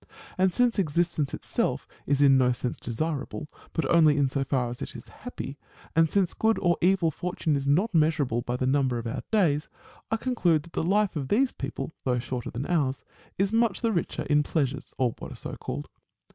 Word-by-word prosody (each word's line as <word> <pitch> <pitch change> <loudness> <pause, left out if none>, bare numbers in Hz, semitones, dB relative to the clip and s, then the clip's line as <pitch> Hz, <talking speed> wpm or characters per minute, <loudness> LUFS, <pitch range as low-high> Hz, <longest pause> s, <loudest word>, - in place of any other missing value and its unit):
And 185 0 +3
since 240 +2 +2
existence 170 -3 +1
itself - - -1 0.2
is 145 0 +3
in 135 -1 +7
no 125 -1 +4
sense 120 +1 -4
desirable, 150 +4 -3 0.2
but 160 - -1
only 155 -3 +5
in 140 -2 +3
so 135 +1 0
far 130 -3 0
as 125 +3 -8
it - - -5
is - - -10
happy; 150 - -8 0.4
and 165 -1 +4
since 190 -3 +2
good 220 0 +2
or 175 -2 +2
evil 180 -2 +3
fortune 165 -2 -1
is 140 0 -2
not 185 +11 +2
measurable 150 -7 +2
by 120 +1 -3
the 130 - -1
number 130 -2 +2
of 115 - -5
our 115 - -3
days; 165 -9 +2 0.4
I 225 - +1
conclude 180 - +1
that 170 - -16
the - - 0
life 195 +3 +2
of 140 -4 -2
these 255 - +2
people, - - -5
though 125 -2 +1
shorter 125 0 -4
than 125 +4 -4
ours, 145 -7 0 0.3
is 195 +2 +1
much 230 -3 +2
the 230 -2 +2
richer 170 -5 -1
in 150 0 +3
pleasures, 145 -3 -2
or 125 -3 +1
what - - -7
are - - -11
so - - -6
called. - - -5
155 Hz, 205 wpm, -27 LUFS, 135-185 Hz, 0.4 s, in